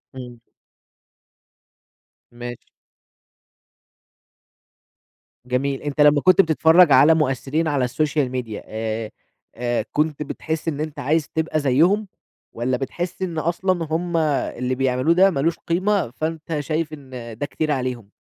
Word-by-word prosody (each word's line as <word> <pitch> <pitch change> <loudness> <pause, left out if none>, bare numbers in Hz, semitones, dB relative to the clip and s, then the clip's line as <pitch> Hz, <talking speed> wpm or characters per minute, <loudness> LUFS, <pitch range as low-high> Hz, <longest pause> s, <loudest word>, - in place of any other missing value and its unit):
إمم. 125 -2 -9 1.9
ماشي. 120 0 -8 2.8
جميل، 135 +2 -1
أنت 145 0 -2
لمّا 145 0 +5
كنت 185 +3 +6
بتتفرّج 160 0 +5
على 145 +5 +7
مؤثّرين 150 +1 0
على 140 -4 +1
الsocial 145 +1 0
media 120 -5 -4
آآ، 110 0 -4 0.4
آآ 120 -2 -1
كنت 150 0 0
بتحس 160 +2 -4
إن 150 -3 -2
أنت 155 -1 -4
عايز 150 +3 0
تبقى 160 -1 -1
زيّهم، 165 +10 +2 0.4
والّا 125 +2 -1
بتحس 175 +8 -5
إن 175 -3 -3
أصلًا 170 +1 0
هُم 170 +1 -1
اللي 135 -5 -1
بيعملوه 130 +4 +2
ده 190 +3 +5
مالوش 165 +2 0
قيمة 185 - 0
فأنت 160 +2 -4
شايف 155 +1 -2
إن 125 -6 -9
ده 145 - -2
كتير 155 +1 -2
عليهم؟ 125 -6 -3
150 Hz, 120 wpm, -22 LUFS, 125-160 Hz, 2.8 s, على